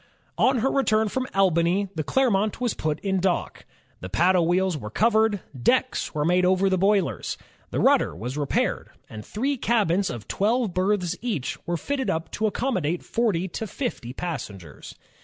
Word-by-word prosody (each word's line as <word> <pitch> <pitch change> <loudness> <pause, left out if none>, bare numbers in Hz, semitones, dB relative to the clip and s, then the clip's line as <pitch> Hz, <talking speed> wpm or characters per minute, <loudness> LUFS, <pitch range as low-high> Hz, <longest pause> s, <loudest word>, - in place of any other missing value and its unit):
On 260 0 +4
her 270 - +2
return 220 -5 +2
from 255 +4 -2
Albany, 185 +1 +2
the 160 - -2
Clermont 215 - +1
was 245 -4 0
put 155 -1 -2
in 190 -1 0
dock. 180 -1 -1 0.3
The 90 - -7
paddle 175 - +3
wheels 185 0 +2
were 105 -8 -6
covered, 220 - +2
decks 245 - 0
were 150 -1 0
made 180 +2 +3
over 190 +1 +3
the 185 - +2
boilers, 195 - +1 0.3
the - - -2
rudder - - +3
was 120 +9 -5
repaired, 145 -2 -1 0.2
and 110 -1 -8
three 270 - -2
cabins 200 -6 +1
of 120 -4 -7
twelve 220 0 0
berths 185 -1 0
each 215 - -3
were 175 0 0
fitted 265 - -2
up 160 -2 -2
to 220 - 0
accommodate 185 - -1
forty 205 -6 0
to 220 - -5
fifty 230 - -4
passengers. 105 - -7
190 Hz, 165 wpm, -25 LUFS, 165-220 Hz, 0.3 s, On